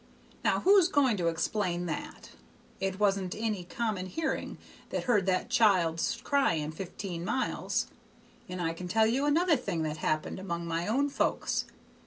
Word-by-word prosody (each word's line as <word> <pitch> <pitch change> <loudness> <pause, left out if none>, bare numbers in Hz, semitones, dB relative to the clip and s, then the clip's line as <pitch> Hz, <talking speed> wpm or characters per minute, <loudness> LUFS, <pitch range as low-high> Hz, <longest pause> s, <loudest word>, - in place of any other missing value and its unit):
Now, - - +2
who's 385 -2 +6
going 280 -9 +3
to 175 -2 0
explain 175 +2 -1
that? 295 - -6 0.5
It 190 0 -2
wasn't 195 -3 +1
any 215 -4 -1
common 205 -2 -2
hearing 315 - -3 0.3
that - - -2
heard 210 -6 +2
that 190 +5 0
child's 190 -2 +3
cryin' 165 - +1
fifteen 175 +1 -6
miles. 260 +8 -1 0.6
And 180 0 -5
I 165 -1 0
can 180 +2 -7
tell 220 +4 +3
you 255 +6 +1
another 330 +3 +4
thing 195 - -2
that 155 0 -2
happened 155 +3 -1
among 170 -3 -4
my 170 +2 -2
own 275 +6 +2
folks. - - 0
195 Hz, 155 wpm, -30 LUFS, 170-245 Hz, 0.6 s, who's